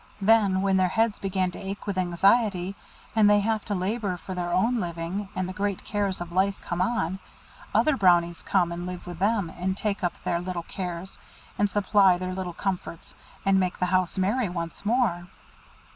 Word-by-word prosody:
Then, 200 -2 +4
when 195 -1 +3
their 185 -1 +3
heads 225 +3 +1
begin 190 -2 0
to - - -9
ache 195 +1 -6
with 200 - -2
anxiety, 185 +1 +2 0.4
and 215 -2 +6
they 205 0 +5
have 220 0 0
to 205 - -2
labour 195 0 -1
for 185 +2 -7
their 175 -1 -3
own 225 +7 +2
living, 175 +2 -4
and 185 -1 -1
the 185 - -5
great 200 0 -2
cares 200 -3 -1
of 175 0 -6
life 195 +2 +1
come 175 0 -3
on, 190 -3 0 0.5
other 305 -2 +3
Brownies 175 -5 +3
come 180 -3 +1
and 175 +1 -4
live 180 -1 -6
with 175 -2 -8
them, 200 -3 +1
and 190 +2 -2
take 205 -2 -2
up 175 - +1
their 170 - 0
little 180 -1 -4
cares, 180 +1 -6 0.4
and 205 0 +3
supply 195 -2 +4
their 185 0 -4
little 185 -2 -4
comforts, 185 -4 -4 0.3
and 195 0 +4
make 185 -1 0
the 180 - +1
house 185 0 +1
merry 205 +4 +1
once 170 0 -5
more." 215 -8 +1
190 Hz, 190 wpm, -26 LUFS, 180-205 Hz, 0.5 s, and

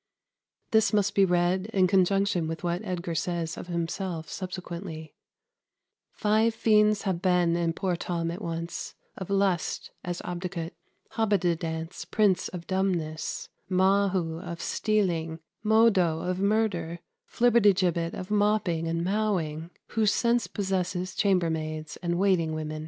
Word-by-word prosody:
] - - -53
This 220 0 +3
must 205 -1 +2
be 195 - +5
read 180 +2 +1
in 190 -2 +4
conjunction 195 -2 +2
with 165 +2 -5
what 175 +1 -1
Edgar 180 -4 -3
says 165 0 -2
of - - -8
himself 170 -1 -3
subsequently: 175 -3 -6 1.0
"Five 220 +1 +2
fiends 210 -2 +3
have 185 -4 -1
been 180 -3 +3
in 170 -1 0
poor 185 +1 -1
Tom 170 -1 -2
at 175 +5 -6
once; 170 -2 -5 0.2
of 190 - -7
lust, 195 -4 0
as 175 0 -3
Obidicut; 175 -1 -4 0.4
Hobbididance, 170 -6 -1
prince 200 -5 +2
of 175 -2 -7
dumbness; 180 -5 -2 0.2
Mahu, 190 -3 +2
of 170 -2 -7
stealing; 175 -8 0 0.2
Modo, 210 -7 +4
of 180 +1 -2
murder; 200 -5 0 0.3
Flibbertigibbet, 195 -8 +3
of 185 +2 -7
mopping 205 -6 +1
and 165 +1 -1
mowing; 175 -6 -1 0.2
who 220 -2 +1
since 235 0 +2
possesses 185 -2 -2
chamber 185 -6 +2
maids 155 -1 -4
and 175 -1 -1
waiting 175 -5 +2
women." 155 0 -4
180 Hz, 130 wpm, -27 LUFS, 170-200 Hz, 1.0 s, be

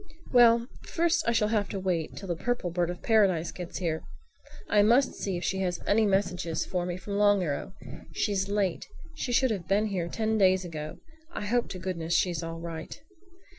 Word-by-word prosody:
"Well, 235 -2 +6 0.2
first 340 0 +1
I - - +4
shall 220 -2 +2
have 210 -2 0
to 195 - -3
wait 180 -4 -1
till 195 - -8
the 175 - -1
Purple 240 -1 -2
Bird 175 0 0
of 175 - -6
Paradise 195 -7 +3
gets 175 -2 -7
here. 165 -3 -1 0.7
I 210 - +4
must 240 +6 +4
see 190 -3 -3
if 175 - -5
she 190 - -1
has 180 -2 -1
any 215 +1 +3
message 190 -2 +1 0.2
for 180 -1 -2
me 175 0 -3
from 200 +2 -4
Long 205 -2 +4
Arrow. 150 +4 -3 0.4
She's 195 +4 -1
late. 200 -4 -1 0.3
She 250 - -4
should 255 0 +3
have 190 -6 -3
been 205 +2 +2
here 185 -5 -2
ten 220 +4 -1
days 190 -1 +4
ago. 155 -2 -6 0.3
I 210 - -5
hope 240 +3 0
to 185 - -5
goodness 170 -3 -2
she's 175 -4 +1
all 165 0 -5
right." 165 - -7
190 Hz, 200 wpm, -28 LUFS, 175-215 Hz, 0.7 s, Well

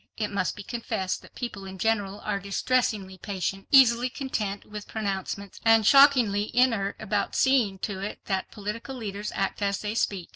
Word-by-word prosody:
It 215 -1 -2
must 195 -2 -1
be 205 - -8
confessed 220 -4 -3
that - - -17
people 235 -6 -5
in 190 0 -8
general 205 -1 -1
are 205 -1 -2
distressingly 200 -1 -1
patient, 195 0 -4
easily 250 -2 +6
content 220 -7 -3
with 210 -1 -8
pronouncements, 200 -2 -4
and 225 -1 +5
shockingly 245 -7 +5
inert 225 -6 +3
about 205 -1 -1
seeing 250 -8 +3
to 195 -3 -5
it 200 +2 -5
that 190 -2 -2
political 220 +6 -6
leaders 210 -3 -5
act 195 +1 -2
as 200 0 +1
they 210 0 -3
speak. 195 -5 -1
210 Hz, 170 wpm, -26 LUFS, 195-230 Hz, -, easily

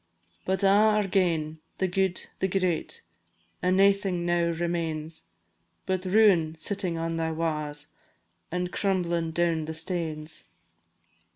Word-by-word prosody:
But 190 +2 0
a' - - +6
are 210 +1 +4
gane! 165 -5 0 0.2
the 190 - +1
guid, 190 0 0
the 190 - +1
great, 185 -3 -1 0.6
And 185 +1 +2
naething 195 -3 +3
now 175 0 +2
remains, 165 -2 -2 0.6
But 185 0 -1
ruin 185 -5 +4
sittin' 180 +1 -1
on 165 0 -2
thy 165 0 0
wa's, 150 -2 -2 0.7
And 180 +1 -2
crumblin' 175 -4 0
down 165 -1 +1
the 160 - -5
stanes. 160 -2 -3
175 Hz, 120 wpm, -27 LUFS, 160-190 Hz, 0.7 s, a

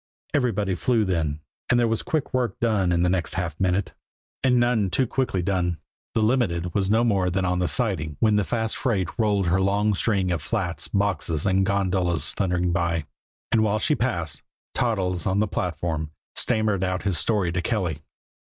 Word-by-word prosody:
Everybody 110 -9 +1
flew 115 +3 +1
then, 80 -5 -1 0.3
and 120 - +4
there 120 - +3
was 115 -1 0
quick 155 -3 -2
work 125 -6 0
done 105 -6 +2
in 85 0 +2
the - - +3
next 90 -4 -1
half 85 -4 -3
minute 95 0 0 0.5
and 125 -2 +4
none 120 -5 +2
too 95 +9 +2
quickly 120 -7 -1
done 90 -2 0 0.4
the 110 - +3
Limited 95 -8 +1
was 100 -2 0
no 110 +3 +3
more 100 -6 +2
than 95 +1 0
on 90 0 0
the 90 - +1
siding 80 - -1
when 110 -2 +3
the 105 - +3
fast 110 +1 -1
freight 100 -9 0
rolled 105 -3 +2
her 90 +2 +2
long 100 +2 +2
string 95 -2 +1
of 85 -4 -1
flats, 90 -5 -3
boxes 90 -6 -1
and 95 0 +2
gondolas 95 -3 +1
thundering 90 -2 0
by. 85 -2 0 0.5
And 115 - +4
while 105 0 +2
she 150 +8 +1
passed, 90 - -2 0.3
Toddles, 95 -7 0
on 95 +1 +1
the 105 - +2
platform, 80 -4 -2 0.2
stammered 105 -3 +1
out 90 0 -1
his 95 -5 +1
story 100 -5 +1
to 90 +1 -1
Kelly. 90 - -1
95 Hz, 185 wpm, -24 LUFS, 90-110 Hz, 0.5 s, and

